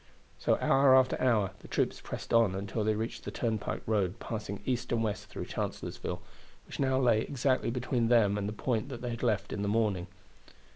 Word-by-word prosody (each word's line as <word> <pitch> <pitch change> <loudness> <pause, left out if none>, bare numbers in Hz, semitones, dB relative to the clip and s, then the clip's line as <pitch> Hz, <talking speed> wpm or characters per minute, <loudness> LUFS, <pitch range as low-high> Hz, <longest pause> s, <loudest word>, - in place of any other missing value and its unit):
So - - +2
hour 135 -1 +5
after 130 -1 +4
hour 110 -7 +3
the - - -13
troops - - -1
pressed - - -6
on 115 -5 +4
until 100 +3 -2
they 110 0 +2
reached 110 +2 -4
the - - -4
turnpike 110 -3 -2
road 100 -2 0
passing 105 -3 -5
east 125 -1 -1
and 115 -1 +1
west 105 -2 -3
through - - -6
Chancellorsville, - - -4 0.4
which - - -9
now 130 -1 +2
lay 120 -4 +4
exactly 130 -1 0
between 120 -1 0
them 115 -4 +4
and 105 0 -2
the - - -5
point 115 +2 -1
that 125 -2 -7
they 120 - -2
had 115 - -5
left 105 -5 0
in 100 - -3
the 100 - -1
morning. 100 -4 +1
115 Hz, 200 wpm, -31 LUFS, 105-125 Hz, 0.4 s, hour